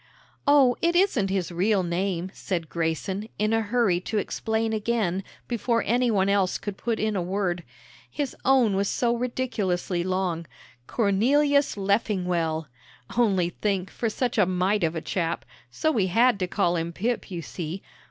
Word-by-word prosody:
"Oh, 275 -4 +5
it 340 +1 +2
isn't 320 - +3
his 190 -3 -1
real 190 +3 +2
name," 180 +1 -2
said 170 -4 -3
Grayson, 175 +6 -2
in 215 +2 +1
a 225 - +3
hurry 215 -5 +2
to 215 +4 -3
explain 220 +2 -1
again 210 -4 0 0.2
before 235 -1 0
any 245 +1 +2
one 195 -3 +2
else 200 -2 +2
could 205 -2 -5
put 230 +2 -2
in 215 -1 0
a 185 - 0
word; 180 -1 -1 0.5
"his 285 -3 -3
own 255 -6 +4
was 200 +1 +1
so 240 -1 +1
ridiculously 225 -8 -1
long, 180 -3 -1 0.4
Cornelius 275 +7 +2
Leffingwell, 180 -6 0 0.5
only 195 -7 +2
think, 195 -1 -2
for 230 - -1
such 240 +1 -1
a 195 - +5
mite 185 +2 +1
of 165 0 +1
a 160 - -2
chap, 170 -1 -2 0.2
so 315 - 0
we 205 -9 +1
had 230 +3 +3
to 185 - 0
call 175 -2 +1
him 165 +1 -2
Pip, 225 +8 -2
you 175 -3 -5
see. 170 +4 -6
200 Hz, 160 wpm, -26 LUFS, 180-230 Hz, 0.5 s, Oh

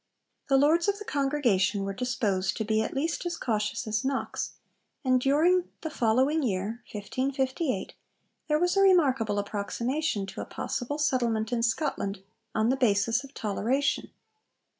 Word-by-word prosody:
The 270 - +5
Lords 315 +6 +4
of 405 0 +1
the 420 - -8
Congregation 245 - +1
were 195 0 -3
disposed 200 -5 -1
to 220 - -2
be 220 0 +2
at 220 - -3
least 320 +4 -1
as 350 0 -3
cautious 215 -3 -1
as 215 0 -1
Knox, 270 0 -2 0.5
and 255 -1 +3
during 330 +7 +3
the 320 - -4
following 260 +5 +2
year, 215 -1 -2
1558, 260 - -2 0.5
there 300 - +3
was 355 +3 +1
a 395 - +4
remarkable 265 - +4
approximation 210 +4 -1
to 195 - -7
a - - -5
possible 275 +2 -3
settlement 240 -6 0
in 235 - +1
Scotland 225 - -1 0.3
on 220 +1 +2
the 265 - +2
basis 230 0 +2
of 275 0 -13
toleration. 235 +7 0
255 Hz, 150 wpm, -28 LUFS, 215-290 Hz, 0.5 s, The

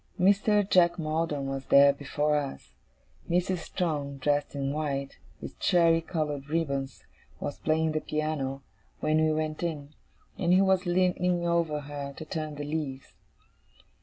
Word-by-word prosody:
Mr. 200 +2 +3
Jack 175 -3 +4
Maldon 155 -3 -1
was 135 0 -4
there, 140 0 +7
before 145 +2 -1
us. 145 -2 -4 0.6
Mrs. 180 +1 +1
Strong, 150 -6 -3
dressed 145 +1 0
in 140 0 -2
white, 140 -3 -3 0.2
with - - -9
cherry 165 -3 +4
coloured 150 -4 -3
ribbons, 140 -5 -2 0.4
was 145 - -5
playing 160 0 +1
the 155 0 -1
piano, 150 -4 -2 0.4
when 155 +1 +2
we 155 - +3
went 155 0 -2
in; 155 -4 -4 0.5
and 180 -1 +3
he 185 - +6
was 190 -1 +2
leaning 180 -1 +1
over 170 -3 +1
her 140 -1 -6
to 155 - -8
turn 155 -1 -4
the 145 - -5
leaves. 145 -3 -4
155 Hz, 145 wpm, -28 LUFS, 140-170 Hz, 0.6 s, there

